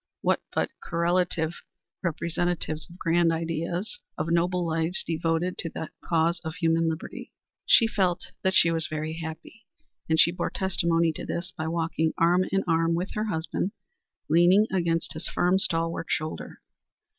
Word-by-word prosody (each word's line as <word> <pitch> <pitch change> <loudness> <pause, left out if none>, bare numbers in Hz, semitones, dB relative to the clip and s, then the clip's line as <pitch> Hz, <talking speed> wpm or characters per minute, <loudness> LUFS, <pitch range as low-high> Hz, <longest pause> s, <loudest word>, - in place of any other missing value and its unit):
What - - +2
but - - 0
correlative 170 -1 0 0.4
representatives 170 -1 -2
of 175 - -13
grand 170 -1 +3
ideas, 165 +4 -2 0.2
of 155 +2 -2
noble 175 +1 +2
lives 165 +2 -1
devoted 165 +2 -1
to 165 - -2
the 160 - -6
cause 170 +1 +1
of 160 -1 -5
human 165 -1 +2
liberty? 160 0 -6 0.4
She 230 - +7
felt 190 -6 0
that 190 0 +1
she 165 - +6
was 165 -1 +1
very 155 0 -3
happy, 165 +7 -9 0.4
and 160 0 +3
she 170 - +6
bore 180 0 -2
testimony 170 -3 +1
to - - -6
this 175 +1 -4
by 160 -1 -3
walking 160 -1 0
arm 175 +2 +4
in 195 0 +2
arm 165 0 +2
with 180 +3 -2
her 215 0 -1
husband, 180 0 -2 0.5
leaning 175 +6 +5
against 170 -3 0
his 155 - -5
firm, 180 +2 +2
stalwart 165 -2 -1
shoulder. 155 +1 -3
170 Hz, 155 wpm, -27 LUFS, 160-180 Hz, 0.5 s, She